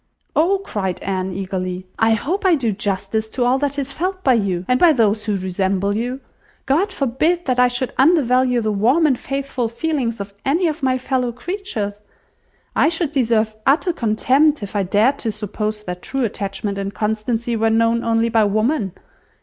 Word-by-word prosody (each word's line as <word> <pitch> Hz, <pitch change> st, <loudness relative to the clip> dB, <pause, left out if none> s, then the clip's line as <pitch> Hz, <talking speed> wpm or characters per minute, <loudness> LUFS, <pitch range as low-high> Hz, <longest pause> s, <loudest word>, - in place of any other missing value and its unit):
"Oh!" 375 Hz, +5 st, +3 dB
cried 190 Hz, -, -3 dB
Anne 190 Hz, -1 st, -2 dB
eagerly, 185 Hz, -1 st, -4 dB
"I 225 Hz, 0 st, +4 dB
hope 345 Hz, -, -2 dB
I 370 Hz, -3 st, +5 dB
do 240 Hz, -7 st, 0 dB
justice 205 Hz, +2 st, -2 dB
to 250 Hz, +2 st, -1 dB
all 255 Hz, +2 st, +3 dB
that 285 Hz, 0 st, -1 dB
is 280 Hz, -1 st, -2 dB
felt 370 Hz, +6 st, -3 dB
by 260 Hz, -, +4 dB
you, 190 Hz, -6 st, 0 dB
and 250 Hz, 0 st, +2 dB
by 340 Hz, -3 st, +6 dB
those 215 Hz, -4 st, +1 dB
who 210 Hz, -2 st, 0 dB
resemble 190 Hz, +2 st, -1 dB
you. 245 Hz, +4 st, -3 dB, 0.4 s
God 330 Hz, +10 st, +1 dB
forbid 315 Hz, +5 st, 0 dB
that 255 Hz, -2 st, 0 dB
I 250 Hz, -, +6 dB
should 245 Hz, +1 st, -2 dB
undervalue 255 Hz, -5 st, +3 dB
the 215 Hz, -1 st, 0 dB
warm 245 Hz, +11 st, +3 dB
and 265 Hz, -5 st, +2 dB
faithful 275 Hz, -3 st, -3 dB
feelings 235 Hz, -2 st, -2 dB
of 200 Hz, 0 st, -6 dB
any 320 Hz, +7 st, +1 dB
of 315 Hz, -1 st, -1 dB
my 260 Hz, -1 st, +2 dB
fellow 255 Hz, -1 st, -1 dB
creatures! 235 Hz, -, -4 dB, 0.7 s
I -, -, +4 dB
should 330 Hz, -3 st, -1 dB
deserve 225 Hz, -5 st, +1 dB
utter 325 Hz, +6 st, +3 dB
contempt 265 Hz, +3 st, +2 dB
if 205 Hz, +1 st, -7 dB
I 205 Hz, -, +2 dB
dared 210 Hz, +9 st, +2 dB
to 225 Hz, -, -2 dB
suppose 210 Hz, 0 st, -4 dB
that 180 Hz, -2 st, -6 dB
true 270 Hz, -1 st, -2 dB
attachment 200 Hz, -1 st, -3 dB
and 195 Hz, 0 st, -3 dB
constancy 220 Hz, +3 st, -1 dB
were 225 Hz, 0 st, +2 dB
known 230 Hz, +1 st, +2 dB
only 230 Hz, 0 st, +1 dB
by 225 Hz, -2 st, +3 dB
woman. 215 Hz, -, 0 dB
230 Hz, 180 wpm, -20 LUFS, 205-275 Hz, 0.7 s, by